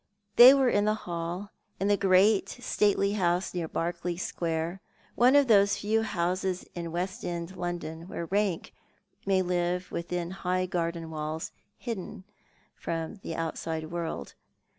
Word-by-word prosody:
They 250 +3 +10
were 270 -2 +3
in 205 -4 +3
the 215 0 +2
hall, 175 +1 -5 0.3
in 195 - 0
the 205 - +4
great 195 +1 +4
stately 205 -5 +1
house 180 -3 0
near 175 -3 -2
Berkeley 170 +1 -3
Square, 170 0 -2 0.3
one 250 +3 +5
of 285 -1 +6
those 200 -3 +5
few 220 +2 +1
houses 185 -2 -1
in 170 -1 -5
West 185 +6 -3
End 170 +1 -4
Loudon, 175 -2 -5
where 170 - -5
rank 195 -1 -1 0.5
may 190 -1 +3
live 180 0 -1
within 175 0 -3
high 185 -1 -1
garden 170 -2 -3
walls, 155 +1 -4 0.3
hidden 220 -3 -6 0.5
from 165 +4 -4
the 165 -4 -6
out 165 -1 -3
side 160 -1 -4
world. 170 -1 -4
180 Hz, 145 wpm, -28 LUFS, 170-200 Hz, 0.5 s, They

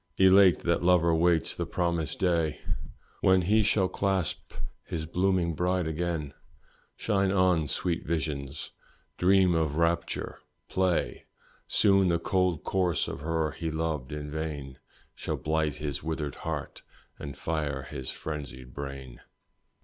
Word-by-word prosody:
Elate 95 -1 +7
that 85 -1 +1
lover 85 -2 +4
waits 85 0 +3
the - - -3
promised 85 -3 -1
day 85 -5 +1 0.6
When 95 -1 +4
he 105 +5 +4
shall 100 -2 +2
clasp 95 -4 -1 0.3
his 80 -1 -4
blooming 90 0 +1
bride 90 +2 0
again 80 -2 -2 0.6
Shine 100 -3 +1
on, 90 -5 +3
sweet 85 +3 -1
visions! 75 -3 -3 0.5
dreams 95 0 +5
of 80 -3 +1
rapture, 85 +1 0 0.3
play! 95 -2 0 0.4
Soon 100 -2 +4
the 85 -1 +3
cold 90 -1 0
corse 90 -3 +1
of - - -5
her 80 -1 0
he 80 +2 -4
loved 80 -4 -2
in 75 0 -5
vain 75 -4 -5 0.3
Shall - - -3
blight 80 -1 0
his 75 -3 -3
withered 80 -2 -3
heart 75 -3 -5 0.4
and 70 0 -7
fire 75 -4 -2
his 65 -1 -6
frenzied 65 -5 -6
brain. 70 -3 -7
80 Hz, 130 wpm, -28 LUFS, 75-90 Hz, 0.6 s, Elate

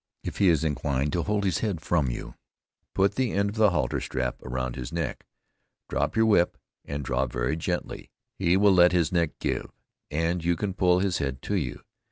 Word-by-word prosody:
If - - -5
he 100 - +5
is 80 -3 +3
inclined 70 -2 -1
to 85 - +1
hold 105 +2 0
his 95 -5 +1
head 100 -7 -1
from 75 -4 +1
you, - - -6 0.6
put 95 +1 +3
the 130 -4 0
end 100 +1 +1
of - - -10
the 110 -1 +6
halter 85 - 0
strap 65 -2 -3
around 65 -1 -3
his 65 +2 -6
neck, 80 -5 -4 0.6
drop - - -1
your 110 0 +4
whip, 105 -6 +3 0.3
and 70 -1 -5
draw 65 +1 0
very - - -1
gently; 80 - -4 0.3
he 85 +2 +3
will 100 0 +5
let 90 0 +6
his 85 -4 +2
neck 85 -3 0
give, - - -2 0.4
and 85 +3 -1
you 85 +1 +2
can 95 +3 -2
pull 90 -1 +3
his 95 -3 0
head 65 -2 -2
to - - -3
you. 75 -10 -3
85 Hz, 205 wpm, -27 LUFS, 70-95 Hz, 0.6 s, the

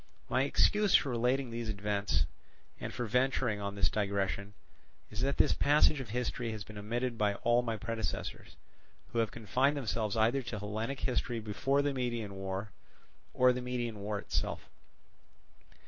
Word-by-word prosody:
My 130 - +3
excuse 210 +7 +4
for 140 - +4
relating 125 +1 +1
these 115 -1 -3
events, 100 - 0 0.5
and - - -4
for 120 - -3
venturing 125 -2 +1
on 100 0 -3
this 95 -4 +3
digression, 100 -1 -1 0.6
is 105 +1 -4
that 140 +2 +1
this - - +4
passage 150 0 +4
of 130 -5 -6
history 120 0 -2
has 105 -1 -5
been 105 -1 -9
omitted 120 +3 -2
by 105 -1 +2
all 120 +3 +3
my 115 -2 -2
predecessors, 110 - -4 0.6
who 115 - +1
have 115 -2 +2
confined 130 +7 +1
themselves 110 -4 -1
either 115 +5 +3
to 115 -3 -5
Hellenic 110 +6 -3
history 120 -2 0
before 135 +6 +1
the 145 -1 +1
Median 120 -5 -2
War, 95 +2 -4 0.6
or 125 0 +5
the 125 - -3
Median 120 -3 -3
War 105 +1 -2
itself. - - -3
115 Hz, 160 wpm, -32 LUFS, 105-125 Hz, 0.6 s, or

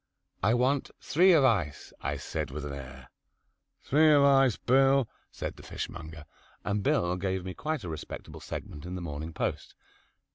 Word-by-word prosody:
"I 110 +3 +3
want 130 +3 +1
three 180 +6 +4
of 160 -5 +6
ice," 90 - 0
I - - -2
said 75 -3 -4
with 75 +2 -5
an 70 - -5
air. 70 -2 -10 0.7
"Three 155 +3 +5
of 145 -1 +6
ice, 135 -4 +5
Bill," 135 0 +4 0.2
said - - -6
the - - -11
fishmonger, 80 -1 -7 0.4
and 105 0 -1
Bill 90 -2 +2
gave 95 0 -2
me 95 - -4
quite 155 +6 -3
a - - -5
respectable 80 -2 -7
segment 75 - -7
in 90 - -5
"The 90 - -5
Morning 80 -1 -5
Post." - - -3
95 Hz, 170 wpm, -29 LUFS, -, 0.7 s, of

